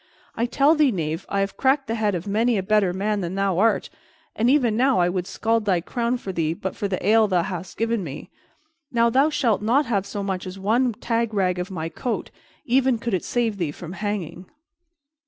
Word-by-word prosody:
I 235 Hz, +2 st, 0 dB
tell 275 Hz, +5 st, +4 dB
thee, 300 Hz, -4 st, +3 dB
knave, 165 Hz, -3 st, -3 dB
I 200 Hz, -, 0 dB
have 195 Hz, 0 st, -3 dB
cracked 270 Hz, +1 st, +2 dB
the 225 Hz, -, -3 dB
head 215 Hz, -3 st, 0 dB
of 170 Hz, -, -4 dB
many 220 Hz, +3 st, +1 dB
a 190 Hz, -, -1 dB
better 210 Hz, -2 st, +2 dB
man 205 Hz, +3 st, -1 dB
than 175 Hz, +1 st, -4 dB
thou 195 Hz, -2 st, 0 dB
art, 225 Hz, +2 st, +2 dB, 0.4 s
and 230 Hz, +3 st, +2 dB
even 255 Hz, -6 st, +3 dB
now 260 Hz, +3 st, +3 dB
I 175 Hz, -1 st, +3 dB
would 180 Hz, 0 st, -2 dB
scald 225 Hz, 0 st, 0 dB
thy 185 Hz, -4 st, +2 dB
crown 235 Hz, +7 st, -1 dB
for 195 Hz, -, -6 dB
thee 165 Hz, -2 st, -1 dB
but 190 Hz, +2 st, -5 dB
for 205 Hz, -, -2 dB
the 185 Hz, -2 st, -3 dB
ale 220 Hz, 0 st, +5 dB
thou 180 Hz, -3 st, +2 dB
hast 180 Hz, -1 st, -6 dB
given 230 Hz, -2 st, 0 dB
me. 145 Hz, -4 st, -8 dB, 0.6 s
Now 235 Hz, -1 st, +3 dB
thou 270 Hz, +5 st, +4 dB
shalt 240 Hz, -9 st, +1 dB
not 250 Hz, +8 st, +2 dB
have 200 Hz, -5 st, -1 dB
so 205 Hz, -, -4 dB
much 190 Hz, -1 st, -3 dB
as 185 Hz, +1 st, -7 dB
one 230 Hz, +5 st, +1 dB
tag 230 Hz, 0 st, -2 dB
rag 180 Hz, -2 st, +1 dB
of 180 Hz, +2 st, -4 dB
my 165 Hz, -4 st, -4 dB
coat, 240 Hz, +8 st, -4 dB, 0.3 s
even 255 Hz, 0 st, +3 dB
could 230 Hz, -1 st, -4 dB
it 185 Hz, -, 0 dB
save 230 Hz, -4 st, -1 dB
thee 165 Hz, -5 st, -1 dB
from 170 Hz, +3 st, -9 dB
hanging." 190 Hz, -4 st, -4 dB
210 Hz, 220 wpm, -23 LUFS, 185-235 Hz, 0.6 s, ale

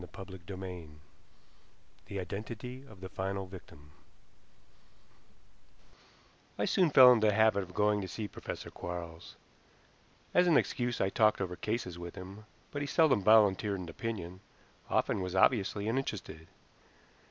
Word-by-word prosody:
CHAPTER 95 Hz, -1 st, -9 dB
II 90 Hz, -4 st, -7 dB, 1.2 s
THE 100 Hz, -, -4 dB
IDENTITY 110 Hz, +7 st, -6 dB
OF 100 Hz, -4 st, -15 dB
THE 95 Hz, -, -7 dB
FINAL 95 Hz, +1 st, -3 dB
VICTIM 75 Hz, -6 st, -13 dB, 2.7 s
I -, -, 0 dB
soon 180 Hz, -3 st, +3 dB
fell 130 Hz, -3 st, +9 dB
into 110 Hz, -3 st, +4 dB
the 105 Hz, -, +3 dB
habit 110 Hz, -1 st, +4 dB
of 90 Hz, -1 st, -10 dB
going 105 Hz, 0 st, +2 dB
to 95 Hz, -, -5 dB
see 105 Hz, +3 st, -5 dB
Professor -, -, -7 dB
Quarles. 85 Hz, -1 st, -7 dB, 1.0 s
As 180 Hz, 0 st, +4 dB
an 165 Hz, -, +5 dB
excuse 120 Hz, -1 st, -1 dB
I 95 Hz, -, +2 dB
talked 110 Hz, +1 st, +3 dB
over 90 Hz, -2 st, -3 dB
cases 95 Hz, -4 st, -3 dB
with 85 Hz, 0 st, -8 dB
him, 95 Hz, +3 st, -10 dB, 0.3 s
but 145 Hz, -, -4 dB
he 145 Hz, -, -2 dB
seldom 140 Hz, -5 st, +3 dB
volunteered 105 Hz, -1 st, +4 dB
an 90 Hz, -2 st, -7 dB
opinion, 95 Hz, -2 st, -5 dB, 0.5 s
often -, -, +1 dB
was 90 Hz, 0 st, -4 dB
obviously 100 Hz, 0 st, +2 dB
uninterested. 105 Hz, -10 st, -3 dB
100 Hz, 135 wpm, -32 LUFS, 90-110 Hz, 2.7 s, fell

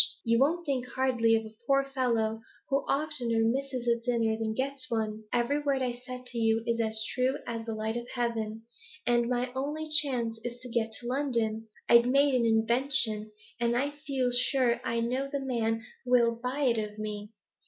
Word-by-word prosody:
You 230 Hz, 0 st, +3 dB
won't 335 Hz, +6 st, +2 dB
think 260 Hz, -4 st, -1 dB
hardly 245 Hz, -3 st, +2 dB
of 225 Hz, 0 st, -1 dB
a 220 Hz, -, -11 dB
poor 275 Hz, 0 st, +4 dB
fellow 225 Hz, -4 st, 0 dB, 0.3 s
who 275 Hz, -, +3 dB
oftener 275 Hz, -6 st, +1 dB
misses 260 Hz, +1 st, -1 dB
a 235 Hz, 0 st, +2 dB
dinner 230 Hz, -2 st, 0 dB
than 220 Hz, 0 st, -3 dB
gets 265 Hz, 0 st, -2 dB
one? 220 Hz, -1 st, -2 dB
Every 245 Hz, +5 st, +1 dB
word 280 Hz, -3 st, 0 dB
I've 245 Hz, -1 st, -3 dB
said 255 Hz, 0 st, -8 dB
to 245 Hz, -1 st, -1 dB
you's 225 Hz, +1 st, +1 dB
as 220 Hz, -1 st, +1 dB
true 260 Hz, +2 st, +1 dB
as 230 Hz, -1 st, -5 dB
the 225 Hz, -, -3 dB
light 220 Hz, +1 st, -2 dB
of 240 Hz, 0 st, -7 dB
heaven, 225 Hz, -2 st, -2 dB, 0.4 s
And 240 Hz, 0 st, +2 dB
my 250 Hz, 0 st, -1 dB
only 295 Hz, +4 st, -3 dB
chance 250 Hz, -7 st, +4 dB
is 240 Hz, 0 st, -5 dB
to 250 Hz, -, -9 dB
get 230 Hz, -1 st, -1 dB
to 240 Hz, +2 st, -4 dB
London. 235 Hz, -5 st, -1 dB, 0.2 s
I've 235 Hz, +1 st, +6 dB
made 275 Hz, +2 st, +4 dB
an 240 Hz, -2 st, +2 dB
invention, 225 Hz, -1 st, +2 dB, 0.3 s
and 235 Hz, 0 st, +1 dB
I 285 Hz, +3 st, 0 dB
feel 275 Hz, -4 st, -2 dB
sure 245 Hz, -1 st, +2 dB
I 230 Hz, 0 st, -1 dB
know 255 Hz, +4 st, -1 dB
a 280 Hz, -, -1 dB
man 225 Hz, -4 st, -1 dB, 0.2 s
who 250 Hz, -, -9 dB
will 235 Hz, -2 st, +5 dB
buy 250 Hz, +5 st, -4 dB
it 240 Hz, -5 st, +2 dB
of 210 Hz, -1 st, -5 dB
me. 210 Hz, -1 st, -5 dB
240 Hz, 190 wpm, -29 LUFS, 225-265 Hz, 0.4 s, I've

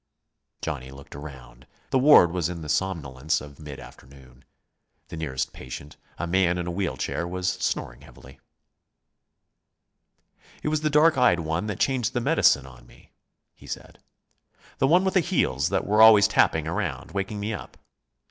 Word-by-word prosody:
Johnny 70 Hz, -5 st, -4 dB
looked 70 Hz, +1 st, -13 dB
around. 70 Hz, -5 st, -11 dB, 0.2 s
The 130 Hz, -, +3 dB
ward 130 Hz, -, +7 dB
was 90 Hz, -1 st, -1 dB
in 85 Hz, -2 st, -6 dB
the 75 Hz, -, -8 dB
somnolence 80 Hz, -3 st, -1 dB
of 70 Hz, 0 st, -12 dB
mid 75 Hz, -3 st, -9 dB
afternoon. 65 Hz, 0 st, -16 dB, 0.7 s
The -, -, -7 dB
nearest 70 Hz, -5 st, -3 dB
patient, 70 Hz, +3 st, -9 dB, 0.2 s
a -, -, -3 dB
man 90 Hz, 0 st, +1 dB
in 90 Hz, -, -3 dB
a 90 Hz, -, -3 dB
wheel 95 Hz, +1 st, -3 dB
chair, 85 Hz, -, -3 dB
was 90 Hz, +1 st, -4 dB
snoring -, -, -3 dB
heavily. 65 Hz, +2 st, -16 dB, 2.2 s
"It -, -, 0 dB
was 155 Hz, 0 st, -1 dB
the 155 Hz, -, +1 dB
dark 150 Hz, 0 st, +4 dB
eyed 105 Hz, -9 st, +4 dB
one 80 Hz, +5 st, -2 dB
that 105 Hz, -, -4 dB
changed 125 Hz, -3 st, 0 dB
the 120 Hz, -, 0 dB
medicine 70 Hz, -, +3 dB
on -, -, -15 dB
me," -, -, -21 dB, 0.4 s
he -, -, -17 dB
said. -, -, -8 dB, 0.8 s
"The 135 Hz, -, +3 dB
one 180 Hz, +6 st, +4 dB
with 190 Hz, -, 0 dB
the 190 Hz, -, +4 dB
heels 155 Hz, -, 0 dB
that -, -, -1 dB
were 105 Hz, +2 st, +3 dB
always 110 Hz, -1 st, +8 dB
tapping 110 Hz, -, +2 dB
around, -, -, -3 dB
waking 100 Hz, +1 st, -3 dB
me 105 Hz, +2 st, -3 dB
up. 100 Hz, -, -9 dB
85 Hz, 165 wpm, -25 LUFS, 70-110 Hz, 2.2 s, always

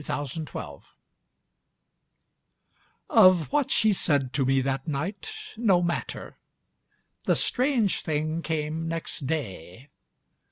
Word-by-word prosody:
7 145 Hz, -, -2 dB
Autoplay 135 Hz, -, -7 dB, 2.3 s
Of 185 Hz, -4 st, +5 dB
what 290 Hz, -2 st, +1 dB
she 220 Hz, -2 st, +4 dB
said 140 Hz, -8 st, +1 dB
to 135 Hz, -, +1 dB
me 135 Hz, 0 st, +3 dB
that 135 Hz, +2 st, -2 dB
nightâno 205 Hz, -, -1 dB
matter. 170 Hz, -, -4 dB, 0.9 s
The -, -, +3 dB
strange 250 Hz, -6 st, +1 dB
thing 155 Hz, +1 st, -2 dB
came 160 Hz, 0 st, -2 dB
next 165 Hz, -4 st, -4 dB
day. 125 Hz, -, -5 dB
160 Hz, 95 wpm, -26 LUFS, 135-190 Hz, 2.3 s, Of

